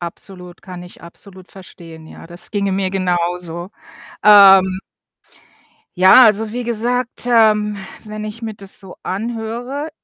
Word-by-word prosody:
Absolut, 180 +1 -10
kann 180 0 -10
ich 180 - -15
absolut 185 +2 -12
verstehen, 165 -4 -14
ja. - - -13
Das 175 +1 -8
ginge 200 -2 -2
mir 190 0 -1
genauso. 175 -1 -3 0.5
Ähm 195 -2 +6 1.2
ja, 190 +8 +7
also 215 0 +2
wie 245 +1 -4
gesagt, 240 +2 -2
ähm, 215 -3 +2 0.3
wenn 215 -1 -8
ich 215 +2 -8
mir 220 -1 -5
das 195 0 -6
so 190 -2 -13
anhöre, 235 +7 -5
195 Hz, 130 wpm, -17 LUFS, 180-220 Hz, 1.2 s, ja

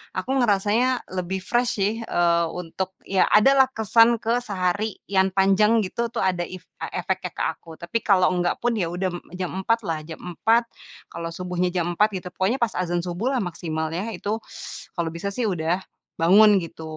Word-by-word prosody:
aku - - -3
ngerasanya 230 +3 +2 0.2
lebih 185 +1 -2
fresh 240 +4 +1
sih, 200 +2 +2
eee, 170 -2 +2
untuk 180 +2 -4 0.2
ya 190 -1 +4
ada 215 +6 +7
lah, 265 - +8
kesan 230 +2 +4
ke 230 +2 +1
sehari 200 0 -1
yang 190 -1 +3
panjang 210 +4 +4
gitu 235 +5 -2
tuh, - - -1
ada 180 -2 +1
if 185 -1 -9 0.2
e - - -1
efeknya 185 0 -2
ke - - -4
aku. 165 - -17
Tapi 170 +6 -2
kalau 185 -3 +5
nggak 175 0 0
pun 240 0 +1
ya 175 - +1
m 175 - -5
udah 190 - +1 0.3
jam 180 -2 -2
4.00 230 +4 +1
lah, 160 -2 -1
jam 160 -1 -9
4.00, 225 +7 +2 0.5
kalau 165 0 -5
subuhnya 180 0 -1
jam 175 -2 0
4.00 210 +1 +4
gitu, 180 - -9
pokoknya 210 +8 0
pas 235 -2 +1
adzan 175 -1 0
subuh 195 +10 -2
lah 245 - +1
maksimal 160 -3 -3
ya, 190 +7 -3
itu 205 +4 -2 0.6
kalau 170 -2 -1
bisa 200 +4 -3
sih 240 +3 -1
udah 175 +1 -1 0.4
bangun 200 +3 +6
gitu, 165 0 -9
190 Hz, 190 wpm, -24 LUFS, 175-220 Hz, 0.6 s, lah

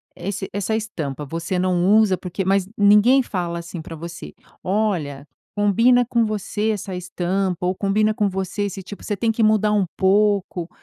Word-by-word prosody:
esse 195 0 -5
essa 205 +2 -2
estampa 155 -11 -4
você 170 +5 -3
não 180 -1 +1
usa 205 -4 +3
porque 180 +1 -4
mas 195 -1 +2
ninguém 210 +6 +5
fala 175 -6 -3
assim 170 0 -7
para 165 - -9
você: 170 +1 -8 0.3
"Olha, 175 -9 -1 0.3
combina 230 +5 +4
com 235 -1 +1
você 215 +1 -2
essa 195 -2 -4
estampa 180 0 -2
ou 185 +1 0
combina 210 +2 +1
com 210 -1 0
você 190 +1 -3
esse 195 -1 -4
tipo 205 - -10
você 205 - -3
tem 225 +3 +1
que 225 +1 0
mudar 215 -1 +3
um 205 -3 +2
pouco." 195 -3 +1
195 Hz, 170 wpm, -21 LUFS, 180-210 Hz, 0.3 s, ninguém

